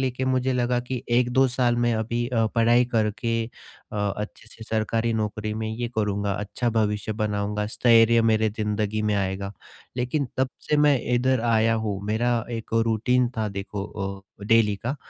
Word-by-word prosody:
लेके 130 0 -1
मुझे 130 0 +1
लगा 125 -1 +1
कि 125 0 -5
1-2 125 +2 +3
साल 125 -1 +1
में 120 0 +2
अभी 115 +2 -1
अ, 115 -3 +1
पढ़ाई 120 +1 +4
करके 115 +1 0 0.5
अ, - - -4 0.2
अच्छे 105 +1 -7
से 110 0 -11
सरकारी 115 +1 0
नौकरी 110 0 -2
में 110 0 -3
ये 120 +2 -3
करूँगा, 100 -2 0
अच्छा 105 +4 -2
भविष्य 105 -1 0
बनाऊँगा, 105 -1 -2
स्थैर्य 115 +1 +4
मेरे 110 -1 +3
जिंदगी 105 0 -2
में 105 -1 +1
आएगा 100 0 -2 0.4
लेकिन 130 +3 -1
तब 130 0 +1 0.2
से 150 - +3
मैं 145 -2 +4 0.2
इधर 130 0 +2
आया 115 -1 +3
हूँ 100 -2 -2
मेरा 115 +3 +1 0.2
एक 115 -2 -5 0.2
रूटीन 120 +3 +2
था 110 -1 -1
देखो 100 0 -5 0.6
अ, - - -7
डेली 110 -2 +4
का 120 +8 -4
115 Hz, 165 wpm, -25 LUFS, 105-120 Hz, 0.6 s, पढ़ाई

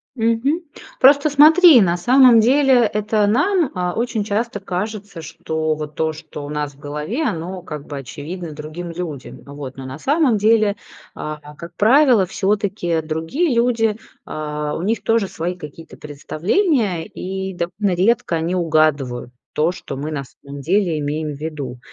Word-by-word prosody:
Мгм. 230 +7 +1 0.4
Просто 285 +3 +6
смотри, 305 +1 +7
на 175 -3 +2
самом 245 +5 +6
деле 270 +4 +4 0.2
это 210 0 +1
нам, 315 - +2
а, 180 -1 -1
очень 230 -1 -1
часто 210 +1 -2
кажется, 195 -1 -5
что 160 -1 -3
вот 150 0 -7
то, 160 0 0
что 155 -1 -9
у - - -8
нас 150 -1 -3
в 135 - -23
голове, 150 - -4
оно 185 - -3
как 150 -4 -8
бы 145 - -7
очевидно 155 +6 -7
другим 155 +4 -7
людям. 165 -6 -7
Э, 140 - -14
вот, 140 -2 -8
но 135 - -7
на 130 +2 -8
самом 280 - +2
деле, 215 -1 +3 0.4
а, 155 0 -6 0.2
как 170 +2 -11
правило, 245 - +5
всё-таки 195 -3 -1
другие 160 - -1
люди, 230 -2 +1 0.3
а, 150 -1 -4
у - - -4
них 220 +5 -1
тоже 225 -3 +1
свои 175 0 -4
какие-то 165 -1 -11
представления, 180 - -1
и 190 +1 -5
довольно 180 +2 -2
редко 190 -1 +1
они 165 +3 -1
угадывают 155 -8 +1 0.2
то, 155 +3 +1
что 175 -6 -8
мы 150 +3 -4
на 140 -3 -3
самом 140 +2 -11
деле 175 0 +1
имеем 150 +1 -3
в - - -13
виду. 145 -5 -6
180 Hz, 160 wpm, -20 LUFS, 155-225 Hz, 0.4 s, смотри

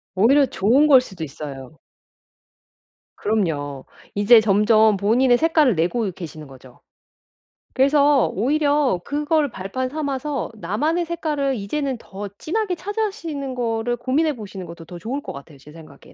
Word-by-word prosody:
오히려 265 +9 +5
좋은 255 +6 +3
걸 270 -3 +8
수도 190 -9 -8
있어요. 140 -1 -8 1.4
그럼요. 150 -10 -2 0.3
이제 210 +3 +6
점점 215 +1 +4
본인의 240 +5 +3
색깔을 310 - +3
내고 195 +7 0
계시는 155 -4 -9
거죠. 130 -2 -16 0.9
그래서 280 0 +4
오히려 285 - +1
그걸 295 0 0
발판 210 +8 -4
삼아서 285 -1 -3
나만의 295 - -1
색깔을 300 -5 -2
이제는 265 +6 -3
더 205 -2 -8
진하게 385 +2 -2
찾아시는 345 - -4
거를 240 -1 -2
고민해 285 +5 0
보시는 195 -4 -8
것도 170 -1 -11
더 175 +2 -10
좋을 245 +10 -4
것 - - -7
같아요 140 +1 -12
제 145 +2 -16
생각엔. 155 -4 -15
240 Hz, 305 characters per minute, -21 LUFS, 190-290 Hz, 1.4 s, 걸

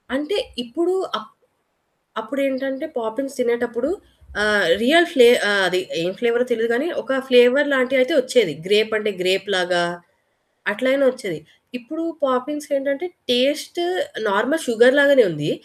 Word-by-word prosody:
అంటే 295 +10 -3 0.3
ఇప్పుడు 340 +10 -2 0.2
ఆప్ - - -12 0.9
అప్పుడు 250 +6 -6
ఏంటంటే 270 +2 -4
పాపిన్స్ 270 +5 -6
తినేటప్పుడు 240 +2 -2 0.5
ఆహ్, 210 -2 +3 0.2
రియల్ 330 +8 +5
ఫ్లే 245 -3 +7 0.2
ఆహ్, 200 -1 +3
అది 180 +1 -1 0.2
ఏం 175 - -2
ఫ్లేవరొ 240 +1 +1
తెలియదు 230 0 -1
కానీ. 275 +8 -1
ఒక 265 0 -2
ఫ్లేవర్ 250 +3 +5
లాంటియి 260 0 +2
అయితే 255 - -1
వచ్చేది 250 -9 +1
గ్రేప్ 215 +2 +2
అంటే 215 0 -2
గ్రేప్ 190 +2 0
లాగా 180 -1 +1 0.9
అట్లయినా 260 +6 +1
వచ్చేది. 205 -11 -7 0.4
ఇప్పుడు 315 +7 -8 0.2
పాపిన్స్ 290 +3 -3
ఏంటంటే 280 +4 -3 0.2
టేస్టు 285 +7 0 0.5
నార్మల్ 250 +12 0
షుగర్ 240 +2 +5
లాగానే 280 -3 +6
ఉంది. 150 -2 -4
250 Hz, 135 wpm, -20 LUFS, 220-275 Hz, 0.9 s, ఫ్లే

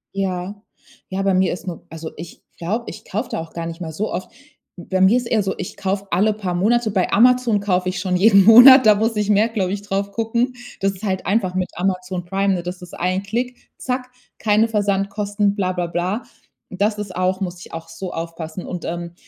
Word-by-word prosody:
Ja. 195 +1 -3 0.5
Ja, 190 +1 -2
bei 195 0 +2
mir 185 0 +2
ist 180 +1 -9
nur 175 -3 -6
also 160 0 -7
ich 170 +2 -10 0.2
glaube, 215 +8 -3
ich - - -9
kaufe 215 +6 -3
da - - -3
auch 165 0 -8
gar 170 -1 -4
nicht 165 +1 -7
mal 160 -2 -4
so 210 +7 -3
oft. 185 - -5 0.5
Bei 185 +1 -3
mir 190 +5 +6
ist 245 -1 -3
eher 220 -3 +2
so, 190 0 -1
ich 185 - -6
kaufe 195 +1 -2
alle 205 +5 +3
paar 195 -4 -4
Monate. 220 +5 +2
Bei 190 -3 0
Amazon 245 -1 +4
kaufe 185 -2 0
ich 185 0 -3
schon 180 0 -1
jeden 200 +1 +6
Monat, 250 +4 +10
da 215 -1 +7
muss 220 +2 0
ich 210 -1 -1
mehr, 210 +2 +4
glaube 195 -5 -1
ich, 200 - -4
darauf 200 0 -2
gucken. 235 +4 -1 0.3
Das 195 0 +1
ist 190 - -14
halt 190 -3 -2
einfach 195 -3 0
mit 185 -1 -1
Amazon 180 0 -2
Prime, 195 +2 +1
ne? 175 - -4
Das 180 +1 -6
ist 180 - -11
ein 185 +2 -1
Klick, 245 +5 -4
zack, 250 0 -3 0.3
keine 215 +1 +3
Versandkosten, 205 -1 0
blablabla. 185 +2 -2 0.5
Und 185 - -9
das 210 +1 +2
ist 205 -3 -6
auch 185 +1 0
muss 180 -2 -4
ich - - -13
auch 165 0 -7
so 185 -2 -7
aufpassen. 165 +1 -6
Und 180 -1 -6
ähm, 170 0 -5
195 Hz, 220 wpm, -20 LUFS, 180-210 Hz, 0.5 s, Monat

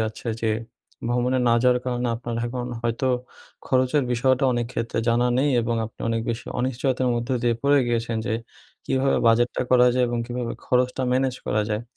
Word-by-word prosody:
যাচ্ছে। 110 +2 -3
যে 110 - +2 0.6
ভ্রমণে 125 +1 +1
না 115 - +5
যাওয়ার 125 -1 +4
কারণে 125 -1 -1
আপনার 120 0 -5
এখন 125 0 -4 0.2
হয়তো 120 +3 -1 0.6
খরচের 130 +2 +2
বিষয়টা 130 +2 +2
অনেক 120 -1 -1
ক্ষেত্রে 115 -1 -3
জানা 120 +1 +3
নেই, 145 +2 +2
এবং 115 0 -1
আপনি 115 - -17
অনেক 115 0 0
বেশি 115 +1 -5
অনিশ্চয়তার 130 0 0
মধ্য 120 +2 -3
দিয়ে 120 -1 +2
পড়ে 140 0 +4
গিয়েছেন, 115 -1 -1
যে 110 - 0 0.5
কীভাবে 135 0 +2
বাজেটটা 120 +2 +3
করা 125 -1 +6
যায় 125 0 +3
এবং 120 0 -2
কীভাবে 120 -1 -3
খরচটা 125 +1 +1
ম্যানেজ 130 0 +1
করা 105 0 +1
যায়। 105 +2 -2
120 Hz, 175 wpm, -24 LUFS, 115-130 Hz, 0.6 s, করা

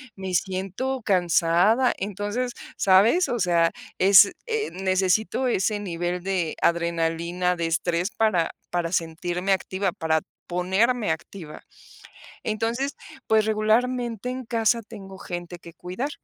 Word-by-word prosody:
me 190 -1 -5
siento 195 +9 -2
cansada. 180 +5 +3
Entonces, 205 +5 -3 0.2
¿sabes? 210 - +4
O 240 - -1
sea, 170 -3 +3 0.3
es 195 +1 +7 0.2
eh, 450 -1 -1
necesito 190 +6 +1
ese 210 -2 0
nivel 175 -2 -3
de 185 -4 -1
adrenalina, 170 +1 0
de 170 -1 -2
estrés 170 +2 0
para 190 -7 +1 0.2
para 175 -1 -1
sentirme 175 +2 -2
activa, 190 0 -1
para 160 -1 0 0.3
ponerme 195 +6 +1
activa. 160 -1 -7 0.8
Entonces, 230 +6 -2 0.3
pues, 220 -1 +4
regularmente 230 +2 0
en 255 0 -5
casa 230 0 +1
tengo 195 -4 -10
gente 175 -1 -7
que 170 -1 -13
cuidar. 185 +11 -5
190 Hz, 120 wpm, -24 LUFS, 175-225 Hz, 0.8 s, es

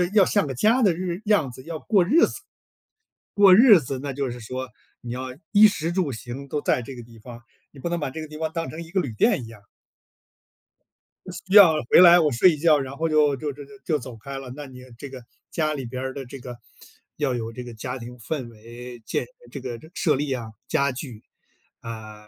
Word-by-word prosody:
要 200 - +7
像 205 -3 +1
个 135 - -4
家 225 - +3
的 190 -5 +4
日 180 +2 -4
样 205 -11 +2
子 130 +2 -12
要 165 -1 -6
过 200 -5 +2
日 305 - +4
子。 - - -8 1.0
过 200 -2 +7
日 220 -4 +8
子， 135 -1 -5
那 140 -1 -4
就 135 -1 -3
是 120 - -7
说 130 +3 -6 0.3
你 120 - -8
要 130 +1 -4 0.2
衣 215 0 +8
食 170 -5 -1
住 170 -6 -1
行 125 +4 -8
都 150 - -2
在 130 -4 0
这 135 - -9
个 120 - -9
地 115 -1 -16
方， 120 +1 -12 0.3
你 140 - -13
不 170 - -3
能 170 0 -2
把 145 -3 -3
这 160 - -7
个 155 - -7
地 155 - -10
方 160 0 -3
当 165 0 -3
成 165 +2 -7
一 165 - -15
个 190 - +1
旅 135 -10 -4
店 120 - +2
一 - - -9
样。 110 -3 -14 1.8
需 190 - -1
要 185 -6 +9 0.2
回 - - +8
来 175 -1 +9
我 155 -4 +2
睡 145 +10 +5
一 155 - -3
觉， 155 -1 +4
然 135 0 -5
后 165 +2 0
就 150 -2 +3
就 145 +2 -4
就 145 +1 -10
就 205 - -15
就 155 -4 0
走 125 -1 -9
开 135 +4 -7
了， 130 -2 -9
那 145 0 -8
你 125 -1 -12 0.2
这 140 +2 -8
个 130 -2 -10 0.3
家 155 -2 0
里 135 -4 -5
边 125 +2 -6
儿 130 0 -4
的 135 - -7
这 135 +2 -10
个 125 -1 -9 0.6
要 140 -4 0
有 115 -1 -5
这 125 +1 -7
个 120 -1 -9
家 125 +4 -5
庭 125 0 -10
氛 125 +3 -5
围， 120 +2 -11
建 - - -2 0.3
这 - - -7
个 120 -3 -6
设 150 -6 +1
立 145 0 -2
啊， 115 -3 -6 0.2
家 140 -3 +1
具 125 -4 -8 0.6
啊 110 -2 -9
140 Hz, 250 characters per minute, -24 LUFS, 125-165 Hz, 1.8 s, 要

